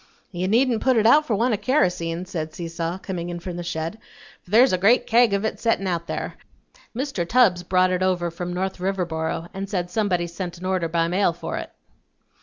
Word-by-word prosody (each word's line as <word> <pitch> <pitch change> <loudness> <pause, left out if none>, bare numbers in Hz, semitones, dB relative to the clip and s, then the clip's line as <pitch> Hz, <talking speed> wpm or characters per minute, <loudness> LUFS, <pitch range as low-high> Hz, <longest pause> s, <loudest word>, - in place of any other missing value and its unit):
"You 180 0 -2
needn't 235 +2 +2
put 260 -2 +3
it 220 - +3
out 300 +6 +6
for 220 - +1
want 235 +3 +1
o' - - +1
karosene," 180 - 0
said 160 -4 -5
Seesaw, 170 0 -4
coming 180 -3 -5
in 175 0 -5
from 175 0 -6
the 175 - -4
shed, 170 +4 -4 0.4
"for - - -22
there's 240 +4 +5
a - - +3
great 220 +7 +4
kag 235 -1 +4
of 200 +1 0
it 220 - -2
settin' 225 -4 +1
out 170 -2 -2
there. - - -4 0.6
Mr. 265 -7 -2
Tubbs 195 -3 +3
brought 185 +1 +2
it 180 0 0
over 180 -2 +1
from 175 +1 -5
North 190 +1 -3
Riverboro 175 -3 -2
and 195 0 -5
said 180 -3 -2
somebody 185 -4 0
sent 175 +1 -6
an 180 - -8
order 185 -2 0
by 165 0 +1
mail 180 0 +2
for 170 - -5
it." - - -7
185 Hz, 210 wpm, -23 LUFS, 175-215 Hz, 0.6 s, out